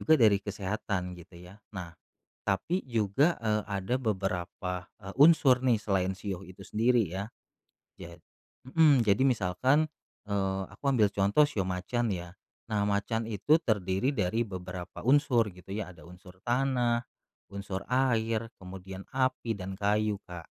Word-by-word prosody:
Juga 160 0 +4
dari 105 -3 +6
kesehatan, 100 -2 -3
gitu 85 0 -14
ya. 90 +3 -13 0.2
Nah, 85 -3 -6 0.5
tapi 105 - 0
juga, 115 - +2
eee, 105 -1 +1
ada 100 +4 -1
beberapa, 90 -4 -3
e - - -12
unsur 145 -5 +6
nih, 125 -4 +4
selain 95 -2 0
shio 100 -3 -5
itu 95 +2 -13
sendiri 115 +1 +2
ya. 95 +5 -5 0.7
Jad 85 0 -10 0.5
mhm, 150 -5 +5
jadi 100 +2 +3
misalkan, 130 - +2 0.4
eee, 95 -1 0
aku - - -17
ambil 110 -6 +4
contoh 100 +8 +3
shio 105 -9 -2
macan 95 +6 -1
ya. 85 0 -7 0.4
Nah, 105 -1 +1
macan 105 +3 -1
itu 115 - +3
terdiri 105 - 0
dari 110 0 +1
beberapa 90 -1 -7
unsur 125 -4 +3
gitu 90 +2 -11
ya, 105 -3 -4
ada 80 -3 -16
unsur 90 +1 -14
tanah, 120 -1 +1 0.5
unsur 100 -1 -5
air, 115 -3 +1
kemudian 95 +1 -8
api 130 -3 0
dan 95 +1 -5
kayu, 105 +1 +1
Kak. 85 -2 -9
100 Hz, 145 wpm, -29 LUFS, 95-120 Hz, 0.7 s, dari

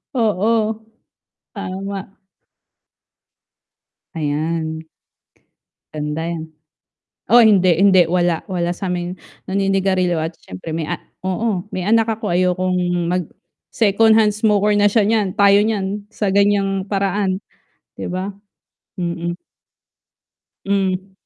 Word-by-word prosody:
Oo, 220 0 +1 0.8
tama. 195 +1 -6 2.0
Ayan. 160 +1 -2 1.1
Ganda 150 +1 -3
yan. 165 -1 -3 0.8
Oh, 240 +3 +7
hindi, 185 -5 +5
hindi, 190 -1 +5
wala, 175 -1 +1
wala 175 -3 -1
sa'ming 180 0 -4 0.3
naninigarilyo, 195 -2 +1
at 160 +1 -4
siyempre 90 - -7
may 160 -1 -3
a - - -1 0.3
oo, 190 -1 -1
may 185 - -2
anak 225 +3 +3
ako, 220 -2 -2
ayokong, 185 +1 +1 0.3
mag 180 -3 -1 0.5
secondhand 220 0 +4
smoker 210 -1 +2
na 205 - +5
siya 210 +1 +3
niyan, 210 -3 +1
tayo 200 -1 +5
niyan, 205 -1 -1
sa 210 -2 -2
ganyang 200 -1 +2
paraan, 195 -1 -1 0.6
'di - - -4
ba? 185 +3 -3 0.7
Mm. 170 0 -3 1.3
Hmm. 195 -1 -1
190 Hz, 100 wpm, -19 LUFS, 175-205 Hz, 2.0 s, Oh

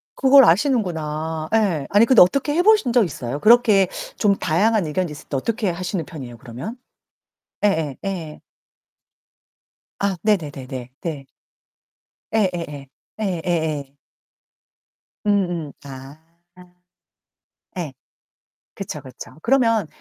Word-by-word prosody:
그걸 270 -1 +7
아시는구나. 160 - 0
예. 185 -10 +1
아니 205 +3 +5
근데 250 0 +6
어떻게 275 +10 +3
해 345 - +3
보신 415 - +4
적 240 -3 +5
있어요? 135 -3 -5
그렇게 215 -3 +5 0.3
좀 200 -2 +3
다양한 200 +4 +1
의견이 165 +2 -2
있을 150 - -11
때 140 - -1
어떻게 220 - -1
하시는 180 0 -3
편이에요, 130 -8 -9
그러면? 130 - -8 0.9
예예. 160 -8 0
예. 170 -6 -5 1.6
아. 200 -2 0
네네네네. 135 - -2
네. 150 -5 -5 1.1
예예예. 170 -9 -1 0.3
예예예. 160 -7 -2 1.3
음음. 175 -7 0
아. 135 +3 -11 1.6
예. 160 -6 -4 0.8
그쵸, 175 -7 -6
그쵸. 130 -2 -11
그러면 230 - +2
175 Hz, 220 characters per minute, -21 LUFS, 150-215 Hz, 1.6 s, 그걸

